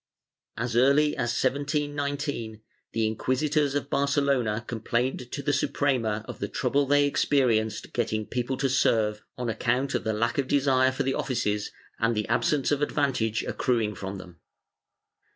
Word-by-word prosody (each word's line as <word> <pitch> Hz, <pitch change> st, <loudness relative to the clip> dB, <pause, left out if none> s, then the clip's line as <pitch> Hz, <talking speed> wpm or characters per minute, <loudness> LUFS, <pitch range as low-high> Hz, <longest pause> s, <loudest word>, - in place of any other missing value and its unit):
As 115 Hz, +1 st, -2 dB
early 140 Hz, +4 st, +4 dB
as 120 Hz, -4 st, -1 dB
1719, 145 Hz, -4 st, -2 dB, 0.3 s
the 115 Hz, -1 st, 0 dB
inquisitors 140 Hz, +6 st, 0 dB
of 145 Hz, -1 st, -2 dB
Barcelona 140 Hz, -6 st, +1 dB
complained 120 Hz, +2 st, -2 dB
to 140 Hz, -, -4 dB
the 145 Hz, +1 st, +1 dB
Suprema 130 Hz, -6 st, 0 dB
of -, -, -8 dB
the -, -, -2 dB
trouble 140 Hz, 0 st, 0 dB
they 145 Hz, +1 st, +4 dB
experienced 115 Hz, -7 st, +1 dB
getting 110 Hz, -2 st, -1 dB
people 125 Hz, +3 st, -2 dB
to 140 Hz, -, +1 dB
serve, 110 Hz, -5 st, +2 dB, 0.2 s
on 125 Hz, -1 st, -3 dB
account 125 Hz, +4 st, 0 dB
of -, -, -1 dB
lack 110 Hz, +4 st, 0 dB
of 135 Hz, -, 0 dB
desire 130 Hz, -2 st, +3 dB
for 135 Hz, +2 st, -2 dB
the 135 Hz, 0 st, 0 dB
offices 105 Hz, -7 st, -1 dB, 0.3 s
and 115 Hz, +1 st, +2 dB
the 105 Hz, -1 st, -1 dB
absence 135 Hz, +5 st, +1 dB
of 145 Hz, 0 st, +1 dB
advantage 130 Hz, -7 st, 0 dB
accruing 115 Hz, -4 st, 0 dB
from 95 Hz, 0 st, -6 dB
them. 90 Hz, -2 st, -12 dB
130 Hz, 150 wpm, -27 LUFS, 110-140 Hz, 0.3 s, early